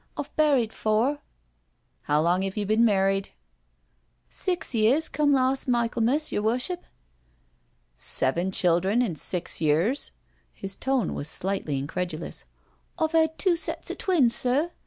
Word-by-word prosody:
I've - - -6
buried 275 -8 +3
four. 230 +7 +1 0.4
" 60 +1 -46
How 150 +1 +3
long 175 +2 +2
have 195 +1 -3
you 210 - -1
been 215 +3 +3
married?" 195 -2 +2 0.6
" - - -44 0.2
Six 360 -7 -1
years 245 +8 +3
come 295 -1 +1
lars' 265 0 +2
Michelmas, 240 +4 +1
yer - - 0
Worship." 250 - -1 1.1
"Seven 165 - -1
children 185 +6 +2
in 205 -8 -1
six 175 +2 -2
years?'* 165 - +1 0.4
His 195 0 -7
tone 260 -6 0
was 145 - -4
slightly 185 -7 -2
incredulous. 160 +4 -4 0.3
" - - -40
I've 320 0 0
'ad 320 -1 +3
two 370 -3 +2
sets 335 - -3
of - - -8
twins, 305 - +3
sir. 275 +6 0
220 Hz, 145 wpm, -26 LUFS, 180-275 Hz, 1.1 s, buried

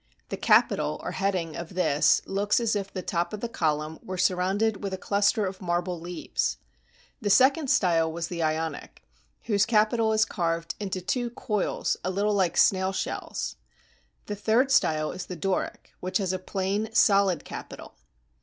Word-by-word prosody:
The - - -3
capital, - - +3
or - - -3
heading, 185 -5 -1
of 170 +1 -7
this 150 -5 +3
looks 205 +3 +1
as 230 -2 0
if 200 -1 -3
the 185 - -5
top 170 +1 -1
of 210 - -4
the 235 - -3
column 155 -6 -1
were 185 0 -6
surrounded 190 +4 +1
with 195 -1 -2
a - - -8
cluster 200 +2 +1
of 190 0 -5
marble 175 0 -1
leaves. 175 +1 -2 0.6
The 205 - -1
second 270 +6 +4
style 165 -6 +3
was 165 0 -4
the 170 -1 -4
Ionic, 160 0 -3 0.4
whose 205 -3 +2
capital 220 0 +3
is 220 0 +3
carved 170 -2 -2
into 190 -3 -3
two 240 +6 -1
coils 210 -4 -1
a 185 - -1
Uttle 205 +2 +1
like 190 -4 +1
snail 190 0 +4
shells. 195 - -4 0.7
The 210 - -4
third 225 +6 +2
style 155 -10 +2
was 185 - -6
the 180 - -6
Doric, 185 +3 -3
which 185 +1 -1
has 190 -2 -1
a 185 - -2
plain, 195 +3 -2
solid 195 -7 +3
capital. - - -9
190 Hz, 170 wpm, -27 LUFS, 175-210 Hz, 0.7 s, second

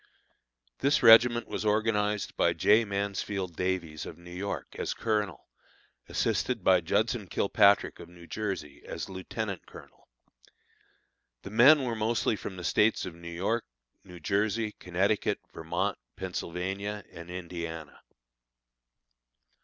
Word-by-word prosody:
This 140 0 +2
regiment 120 +1 +7
was - - -4
organized 105 -1 +1
by - - +3
J. 110 +2 +4
Mansfield 100 -2 -3
Davies, 90 -4 -2
of - - -9
New 90 0 -12
York, 100 +2 -5
as - - -2
colonel, 105 - -2 0.6
assisted - - 0
by 90 -2 +5
Judson 110 +5 0
Kilpatrick, 100 +3 +3
of 85 - -10
New 85 -1 -14
Jersey, 95 -8 -4
as - - -6
lieutenant 95 -1 -5
colonel. - - -15 1.4
The 100 - -8
men 135 +6 +7
were 120 -2 -1
mostly 110 0 +1
from 100 - -7
the 90 - -7
States 105 +5 +2
of 90 - -6
New 85 0 -10
York, 100 +7 -1 0.4
New 90 -1 -12
Jersey, 105 +5 0
Connecticut, 95 +4 0
Vermont, - - -2 0.2
Pennsylvania, 95 +3 -4
and 85 +1 -10
Indiana. 85 -3 -6
100 Hz, 120 wpm, -29 LUFS, 90-110 Hz, 1.4 s, regiment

